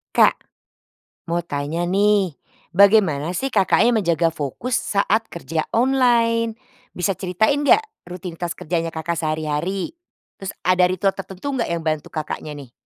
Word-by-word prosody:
Kak, - - +4 0.8
mau 170 0 -1
tanya 150 +3 -2
nih. 200 -1 +2 0.4
Bagaimana 180 -5 +4
sih 270 0 -2
Kakaknya 230 +5 +4
menjaga 170 -2 +1
fokus 165 - -4
saat 220 +1 +1
kerja 165 -1 -3
online? 230 -2 +2 0.3
Bisa 190 +2 -1
ceritain 210 +10 +1
nggak 430 +10 +4 0.2
rutinitas 175 -1 -5
kerjanya 165 0 -2
Kakak 165 +1 -3
sehari-hari? 160 - -2 0.5
Terus 195 0 -6
ada 180 0 +4
ritual 190 +2 +1
tertentu 195 +8 -6
nggak 250 -3 -1
yang 170 -1 -3
bantu 155 -1 -1
Kakaknya 155 -1 -5
nih? 135 -4 -11
180 Hz, 130 wpm, -21 LUFS, 165-220 Hz, 0.8 s, Kak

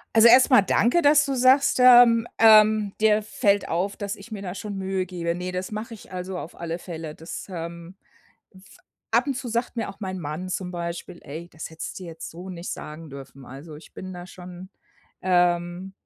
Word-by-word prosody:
Also, 225 +1 +8
erstmal 255 0 +7
danke, 235 - +2
dass 290 -1 +5
du 275 - -2
sagst, 260 +2 +4
ähm, 240 -2 +7
ähm, 215 -2 +6
„dir 215 0 +3
fällt 205 -1 0
auf, 185 +4 -1
dass 205 +1 -5
ich 200 +4 -13
mir 210 -2 -6
da 180 -3 -5
schon 205 0 -6
Mühe 190 -1 -2
gebe“. 170 -2 -3
Ne, 180 +1 -5
das 185 +2 -4
mache 215 +2 -6
ich, 220 - -14
also, 185 0 -5
auf 170 - -9
alle 170 0 -4
Fälle. 160 -3 -7
Das, 165 +1 -8
ähm, 170 0 -7 0.6
f 190 - -16 0.5
ab - - +2
und 280 - -1
zu 255 0 -5
sagt 235 +2 -2
mir 225 -2 -3
auch 195 - -10
mein 190 -3 -5
Mann 155 +4 -5
zum 185 0 -4
Beispiel: 175 0 -6
„Ey, 160 +5 -8
das 155 -2 -9
hättest 160 0 -7
du 185 - -9
jetzt 165 -1 -8
so 180 +3 -9
nicht 175 -1 -7
sagen 155 +1 -8
dürfen.“ 135 0 -11
Also, 140 +5 -11
ich 150 - -15
bin 185 0 -8
da 175 0 -8
schon, 180 0 -11 0.5
ähm, 175 0 +1
185 Hz, 200 wpm, -24 LUFS, 170-215 Hz, 0.6 s, Also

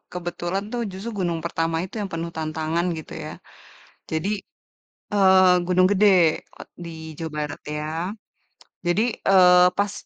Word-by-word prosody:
kebetulan 175 +2 -3
tuh 240 - -2
justru 195 +4 -6
gunung 170 -2 -1
pertama 165 -1 -1
itu 190 - -10
yang 200 - -3
penuh 165 0 -4
tantangan 160 +2 -2
gitu 155 - -10
ya. - - -6 0.8
Jadi, 160 +5 -1 0.8
eee, 190 -2 +6
Gunung 185 0 +4
Gede 190 -5 +4 0.2
o - - -8
di 160 -2 -9
Jawa 160 -1 -4 0.2
Barat 145 - -9 0.2
ya. 150 - -4 1.0
Jadi, 175 +5 +2 0.3
eee, 180 -2 +7
pas 200 0 +1
175 Hz, 135 wpm, -23 LUFS, 165-190 Hz, 1.0 s, eee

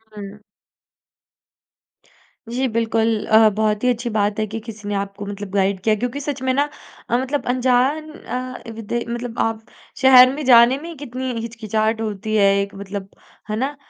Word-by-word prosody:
हुँ। 205 0 -9 2.1
जी, 255 +3 -1
बिल्कुल। 225 -1 +1
अ, 220 0 +6
बहुत 215 0 0
ही 250 - +3
अच्छी 240 0 -1
बात 205 +1 0
है 215 - +1
कि 225 +2 -5
किसी 210 -2 -8
ने 205 - -1
आपको 200 +1 -4
मतलब 205 0 -6
गाइड 195 -1 +1
किया 215 -1 +3
क्योंकि 245 +6 -3
सच 280 -2 -4
में 260 0 +1
ना 285 +2 +1 0.4
अ, 240 - +2
मतलब 265 +3 -2
अनजान 260 +5 +1
अ, 255 -3 -6
विदे 225 +2 -3
मतलब 240 0 -5
आप 225 -1 0 0.4
शहर 255 -1 +8
में 300 - -5
जाने 245 +1 +7
में 335 +3 -8
ही 335 - -8
कितनी 260 -2 -5
हिचकिचाहट 220 -1 -2
होती 215 0 -3
है 200 -1 +5
एक 200 0 -5
मतलब, 195 0 -7 0.4
है 215 - -1
ना? 270 +5 -2
225 Hz, 175 wpm, -21 LUFS, 210-255 Hz, 2.1 s, शहर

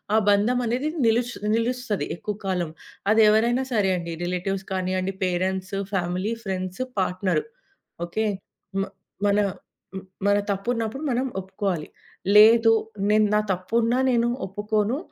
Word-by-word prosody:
ఆ - - +6
బంధమనేది 245 +6 +2 0.2
నిలూస్ 235 +2 +2 0.2
నిలుస్తది 230 - -1
ఎక్కువ 210 +3 -4
కాలం. 180 -4 -1 0.4
అదేవరైనా 225 +4 +4
సరే 200 -3 +2
అండి, 170 -1 -5
రిలేటివ్స్ 190 +2 -2
కానివ్వండి, 185 +1 -1
parents, 185 +2 -1 0.2
family, 185 +4 -1
friends, 185 +3 -3 0.2
partner 185 - 0 0.6
okay. 220 +6 -2 0.6
మ - - +1 0.4
మన 200 +1 +3 0.6
హ్మ్. 190 0 -6 0.2
మన 205 0 +4
తప్పున్నప్పుడు 230 +6 -2
మనం 250 +2 0 0.2
ఒప్పుకోవాలి. 190 -4 -3 0.5
లేదు 225 +2 +8 0.4
నేను 215 0 +5
నా - - +5
తప్పున్నా 230 +6 0
నేను 235 0 +2 0.2
ఒప్పుకోను, 210 +5 -1
205 Hz, 115 wpm, -24 LUFS, 185-230 Hz, 0.6 s, లేదు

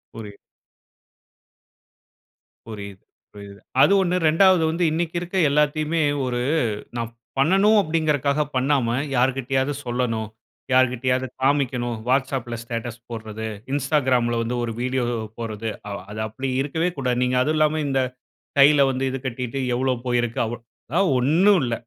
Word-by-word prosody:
புரியு 105 -3 -9 2.3
புரியுது, 100 -3 -8 0.3
புரியுது. 100 -1 -11 0.2
அது 200 - +6
ஒண்ணு, 180 -1 0
2ஆவது 180 +1 +5
வந்து 165 +2 -1
இன்னிக்கு 165 +1 -2
இருக்க 180 +2 -7
எல்லாத்தையுமே 150 +2 +1 0.2
ஒரு 120 -1 -1 0.6
நான் 115 -1 -3 0.3
பண்ணணும் 195 +9 +4
அப்டிங்க்றதுக்காக 150 -3 0
பண்ணாம 130 -3 +1 0.2
யார்கிட்டயாவது 135 +2 +1
சொல்லணும். 120 -3 -2 0.4
யார்கிட்டயாவது 130 0 +2
காமிக்கணும். 130 -3 +1
Whatsappல 130 -2 0
ஸ்டேட்டஸ் 115 0 -5
போடறது, 110 -1 -6 0.3
Instagramல 130 -4 +1
வந்து 115 +2 -2
ஒரு 115 - -2
வீடியோ 130 0 0 0.3
போடறது. 115 -1 -4 0.4
அது 105 - -6
அப்படி 130 +5 -5
இருக்கவே 160 +5 -1
கூடாது. 125 -3 0
நீங்க 125 0 +1
அதுவும் 155 +4 +1
இல்லாம, 155 0 +2
இந்த 135 -1 +1 0.6
கையில 140 +1 +6
வந்து 130 0 -3
இது 135 - -3
கட்டிக்கிட்டு 125 +1 -3 0.2
எவ்ளோ 130 +1 +1
போயிருக்கு 120 -1 0
அவ. 110 - -4 0.4
அதெல்லாம் 180 +5 +2
ஒண்ணு 160 +11 +4
இல்ல. 120 - -1
130 Hz, 125 wpm, -23 LUFS, 120-150 Hz, 2.3 s, அது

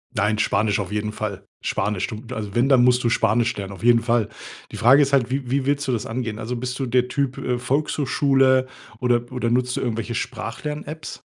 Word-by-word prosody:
Nein, 105 0 +1
Spanisch 105 0 +1
auf 100 0 -4
jeden 105 0 -2
Fall. 100 -3 -5 0.2
Spanisch, 105 -3 -1
du 110 +1 -7
also 105 -3 -5
wenn, 120 +3 +3
dann 125 -3 +6
musst 125 0 +4
du 115 - +2
Spanisch 115 +1 +2
lernen, 100 0 -5
auf 100 - -12
jeden 120 -1 +5
Fall. 115 -3 +1 0.4
Die - - -7
Frage 130 +5 +6
ist 140 0 +1
halt, 125 -3 +3
wie 130 -2 -3
wie 135 -1 +1
willst 145 0 0
du - - +1
das 115 - -1
angehen? 115 -2 -4
Also 125 +3 -4
bist 125 +2 -4
du 135 - -1
der 125 +1 +2
Typ, 135 -1 -1
äh, 125 -1 -2
Volkshochschule 135 -1 +2 0.3
oder 120 0 0
oder 120 -2 -1
nutzt 125 0 +1
du - - -1
irgendwelche 115 -1 -2
Sprach-Lern-Apps? 150 +7 -5
120 Hz, 210 wpm, -22 LUFS, 110-130 Hz, 0.4 s, dann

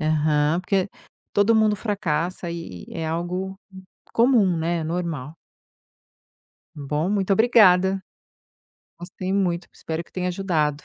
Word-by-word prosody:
Aham, 155 +1 +2
porque 190 0 0 0.4
todo 205 +3 +4
mundo 215 -1 +4
fracassa 180 -4 -2
e 165 - -7
é 165 -2 -4
algo 180 +4 -3 0.5
comum, 230 -7 +4
né, 165 0 -1
normal. 160 -4 -3 1.4
Bom, 150 +4 -2
muito 200 -1 0
obrigada. 195 -3 +5 1.0
Gostei 185 +1 -5
muito, 180 -3 0
espero 160 +1 -5
que - - -27
tenha 180 -1 -2
ajudado. 160 -6 -1
180 Hz, 110 wpm, -23 LUFS, 160-195 Hz, 1.4 s, obrigada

